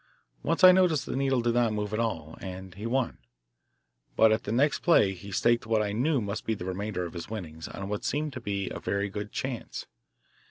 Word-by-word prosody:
Once 165 - 0
I 185 - +12
noticed 180 -5 +3
the - - -4
needle 135 -2 +2
did 120 0 +1
not 120 -2 +2
move 105 0 -3
at 105 - 0
all, 80 -9 -2
and 95 -1 -7
he 105 +5 -5
won. 125 +1 0 1.0
But 110 0 +6
at 110 - +1
the 105 - -2
next 140 +5 +2
play 105 - +4
he 100 +2 -10
staked 120 +3 +2
what 110 -1 +2
I 105 - -2
knew 135 +7 +1
must 100 0 -3
be 110 - -1
the 90 - -7
remainder 95 0 -3
of 85 - -7
his 85 +1 -7
winnings 80 -7 -6
on 95 - -6
what 105 0 -3
seemed 150 0 -1
a 100 -2 -3
very 100 0 -1
good 105 +1 -5
chance. 130 -3 -4
110 Hz, 210 wpm, -28 LUFS, 100-120 Hz, 1.0 s, I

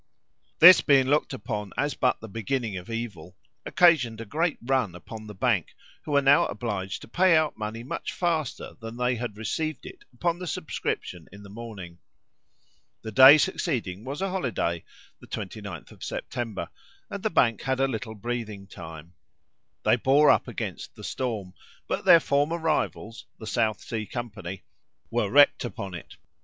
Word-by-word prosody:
This 180 +2 +10
being 135 -3 +4
looked 145 +3 +1
upon 105 -5 -5
as 145 0 0
but 125 - +1
the 110 - -8
beginning 115 +1 -3
of 90 +2 -7
evil, 100 -7 -6 0.3
occasioned 135 -11 +4
a 115 - -6
great 160 +9 -1
run 125 -8 0
upon 110 +5 -10
the 105 - -9
Bank, 105 -5 0 0.3
who 150 - -7
were 140 0 +4
now 140 +1 +5
obliged 100 -3 -4
to - - -11
pay 180 +6 +4
out 155 -1 +1
money 110 +1 -5
much 130 - -5
faster 165 -6 -2
than 115 0 -8
they 125 0 0
had 115 -3 -5
received 150 +6 -3
it - - -11
upon 170 +7 -1
the 180 - -6
subscription 90 - -4
in 100 +1 -12
the 100 - -12
morning. 100 -6 -9 1.0
The 110 - -5
day 130 +7 +10
succeeding 125 - -1
was 140 +7 -4
a 195 - 0
holiday 115 - -2 0.3
(the - - -15
29th 100 -4 -7
of - - -13
September), 115 -5 -4 0.4
and - - -5
the - - 0
Bank 115 -3 +2
had 130 0 -1
a 135 - +3
little 110 -3 -5
breathing 110 -2 -5
time. 80 -3 -11 0.7
They - - +4
bore 140 +5 +5
up - - +2
against - - -6
the - - -12
storm; 110 -8 -4 0.3
but - - -3
their 170 - +9
former 145 +3 +1
rivals, 155 -8 -2
the 110 - -9
South 110 0 0
Sea 110 -2 -5
company, 105 -7 -6 0.5
were 115 -4 0
wrecked 145 +4 +5
upon 110 -6 -6
it. 85 - -9
115 Hz, 170 wpm, -26 LUFS, 100-140 Hz, 1.0 s, This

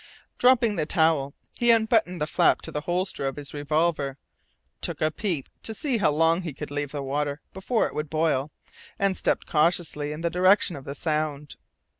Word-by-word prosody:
Dropping 240 -4 +4
the 155 -2 -1
towel, 160 -5 +2 0.2
he 240 - +2
unbuttoned 220 -5 +3
the 150 - 0
flap - - +2
to - - -6
the 150 - -3
holster 175 -3 -2
of 135 - -3
his 145 -1 -6
revolver, 145 -1 0 0.6
took - - -2
a 155 0 +1
peep 165 -6 -3
to 220 - -5
see 275 -3 -1
how 180 - +3
long 165 +3 +2
he 165 -5 -5
could 150 - -7
leave 145 -1 -3
the 145 -2 -4
water 145 +1 -2
before 215 +5 0
it - - -5
would 150 0 -3
boil, 155 -3 0 0.5
and 195 -1 +1
stepped - - 0
cautiously 155 -2 0
in 150 +2 -6
the 170 0 -1
direction 185 0 +3
of 140 -1 -9
the 140 -1 -6
sound. 150 -2 -2
155 Hz, 190 wpm, -26 LUFS, 145-185 Hz, 0.6 s, Dropping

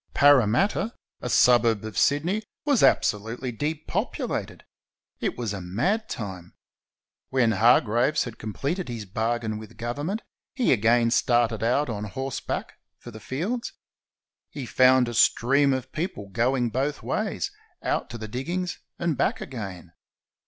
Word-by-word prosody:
Parramatta, 145 - +4 0.3
a 125 - -3
suburb 115 -3 +4
of 110 - -7
Sydney, 170 +9 +2 0.2
was 285 -5 +3
abso 105 - +4
lutely 120 +4 -5
depopulated. 150 +6 -3 0.6
It - - -2
was 115 -4 -2
a 95 - -5
mad 180 - -1
time. 95 -5 -6 0.7
When 125 -4 +3
Har 115 +2 +5
graves 120 +6 +1
had 120 -2 -8
completed 140 - -3
his 115 -3 -5
bargain 110 +2 -2
with 110 -1 -12
Government, 145 - -3 0.3
he 250 - +3
again 115 +1 +3
started 120 -2 +2
out 125 +6 +2
on 105 -3 -4
horseback 130 +5 -4 0.2
for 120 - -11
the 110 - -10
fields. 190 - -3 0.8
He 140 -3 -6
found 130 +1 +5
a 120 - -4
stream 135 +5 +4
of 130 -1 -2
people 155 - -4
going 120 +3 +1
both 135 +5 -2
ways, - - -2 0.3
out - - -1
to 120 - -6
the 110 -1 -6
diggings 175 - -3 0.2
and 170 -3 0
back - - 0
again. 95 -9 -7
120 Hz, 140 wpm, -25 LUFS, 110-145 Hz, 0.8 s, Har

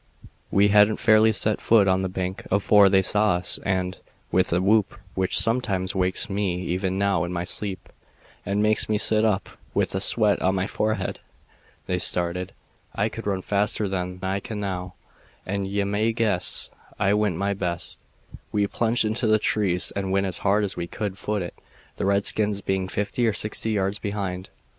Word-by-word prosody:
We 100 +1 +4
hadn't 105 +1 +5
fairly 110 0 +5
set 110 0 0
foot 110 -4 +4
on 95 0 +2
the 95 - -2
bank 95 +1 -4
afore 100 0 +5
they 95 0 +4
saw 105 0 +2
us 90 - 0
and, 95 -1 -1 0.3
with 95 +1 +2
a 85 - +2
whoop 105 +5 +2 0.2
which 95 -1 +1
sometimes 100 -3 +1
wakes 95 +3 +1
me 95 -3 -1
even 95 +1 -2
now 100 -3 +1
in 85 - -4
my 85 -1 -2
sleep 95 +1 -3 0.6
and 100 +1 0
makes 110 0 +1
me 105 - +2
sit 110 +1 +3
up 105 -3 +1 0.3
with - - +1
the 95 - -1
sweat 105 +1 +3
on 95 +1 +2
my 95 0 0
forehead 110 +2 -2 0.7
they 90 -1 -1
started. 90 +2 0 0.4
I - - 0
could - - -7
run 95 -2 -1
faster 105 +1 0
then 90 -1 -3
than 95 +1 -5
I 100 - -1
can 105 +1 -6
now, 90 -3 -4 0.5
and 100 0 -2
ye 100 +1 -1
may 105 +3 0
guess 105 -6 -1 0.3
I 100 0 +2
went 105 -4 +1
my 100 +3 -1
best. 90 -3 -3 0.5
We 105 -1 +1
plunged 115 +3 +1
into 110 +2 0
the 110 0 +5
trees 100 -4 0
and 95 -1 -2
went 100 0 +1
as 95 -3 -2
hard 100 +1 +2
as 100 - -3
we 85 - -4
could 100 +1 -4
foot 105 -1 -2
it, 85 - -7 0.4
the - - -1
redskins 100 +1 +1
being 95 -1 -1
fifty 105 +5 -1
or 110 - +1
sixty 105 +2 -2
yards 100 -1 -1
behind. 100 -3 -4
100 Hz, 185 wpm, -24 LUFS, 95-105 Hz, 0.7 s, hadn't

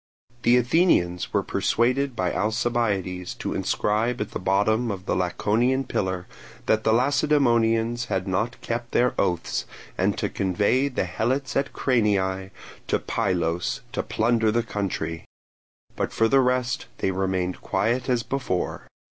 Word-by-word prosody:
The 120 +1 +5
Athenians 120 - +2
were - - +1
persuaded 125 +3 +1
by 90 -3 -1
Alcibiades 105 -5 -1
to - - -4
inscribe 110 +4 0
at 105 - -3
the - - -4
bottom 105 +5 +1
of 95 -3 -5
the - - 0
Laconian 110 +9 +1
pillar 95 -7 -2 0.4
that 110 0 +2
the 110 - +3
Lacedaemonians 120 -3 +2
had 95 -1 -2
not 100 +5 -1
kept 120 0 -4
their 125 +1 +3
oaths, 85 -2 -1 0.3
and - - +1
to - - 0
convey 100 +8 +1
the 135 - -1
Helots 130 +4 -1
at 140 0 0
Cranii 95 -6 +1 0.4
to - - +2
Pylos 90 -5 -1
to - - -1
plunder 115 0 +1
the 120 +1 +1
country; 90 -7 -3 0.7
but - - -2
for 115 - +2
the 135 +4 +4
rest 125 -1 0
they 95 - 0
remained 95 -1 -1
quiet 120 +4 0
as 120 -2 +1
before. 130 -10 -3
110 Hz, 140 wpm, -25 LUFS, 95-125 Hz, 0.7 s, The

